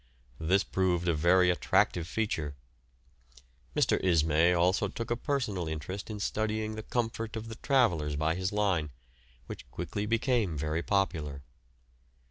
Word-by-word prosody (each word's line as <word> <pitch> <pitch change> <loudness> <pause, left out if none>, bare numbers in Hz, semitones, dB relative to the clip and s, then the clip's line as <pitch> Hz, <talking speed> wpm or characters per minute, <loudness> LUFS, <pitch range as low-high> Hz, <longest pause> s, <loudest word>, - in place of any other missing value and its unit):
This 95 +5 +2
proved 90 -2 0
a 85 - +3
very 90 +4 +4
attractive 85 -1 +1
feature. 80 -8 -2 1.2
Mr. - - +2
Ismay 80 -1 +4
also 90 +4 +2
took 115 +4 -5
a - - +3
personal 115 - -2
interest 80 +7 -5
in 105 -1 -5
studying 110 +1 -1
the 110 - -5
comfort 115 0 -3
of 110 0 -5
the 110 - -6
travellers 90 - +2
by 80 +2 +1
his 95 +2 -2
line, 95 -7 +1 0.6
which - - -9
quickly 105 +1 -4
became 115 - +1
very 75 +3 -1
popular. 80 -9 -1
95 Hz, 135 wpm, -30 LUFS, 80-110 Hz, 1.2 s, very